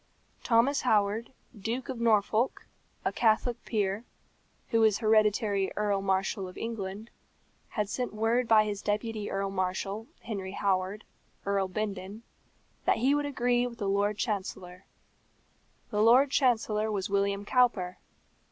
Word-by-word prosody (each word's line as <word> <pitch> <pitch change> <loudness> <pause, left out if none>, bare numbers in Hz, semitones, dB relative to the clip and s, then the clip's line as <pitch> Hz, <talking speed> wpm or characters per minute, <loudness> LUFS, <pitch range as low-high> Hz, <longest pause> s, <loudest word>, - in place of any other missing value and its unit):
Thomas 245 +4 +3
Howard, 215 0 +1 0.2
Duke 225 +5 -4
of 255 -3 -5
Norfolk, 225 +2 +2 0.4
a - - +2
Catholic 230 +1 +1
peer, 205 -1 -1 0.7
who 230 -2 +3
is 220 -2 +4
hereditary 215 -3 +2
Earl 205 -2 0
Marshal 195 0 0
of 180 - -11
England, 215 -1 -5 0.6
had 210 -2 -2
sent 250 +4 -3
word 225 +3 +1
by 220 -1 +6
his 205 -1 -3
deputy 210 0 -2
Earl 195 0 -2
Marshal, 195 +3 -2
Henry 195 -4 -5
Howard, 195 +1 -1 0.4
Earl 200 -1 +1
Bindon, 200 +1 -4 0.6
that - - +3
he 260 +5 +3
would 290 0 0
agree 245 -3 +1
with 235 -1 -9
the 205 - -3
Lord 200 +1 +1
Chancellor. 185 -4 -4 1.1
The 210 -1 +1
Lord 250 +5 +6
Chancellor 220 -5 +2
was 200 -1 -2
William 200 0 0
Cowper. 205 -8 +2
210 Hz, 135 wpm, -29 LUFS, 195-230 Hz, 1.1 s, by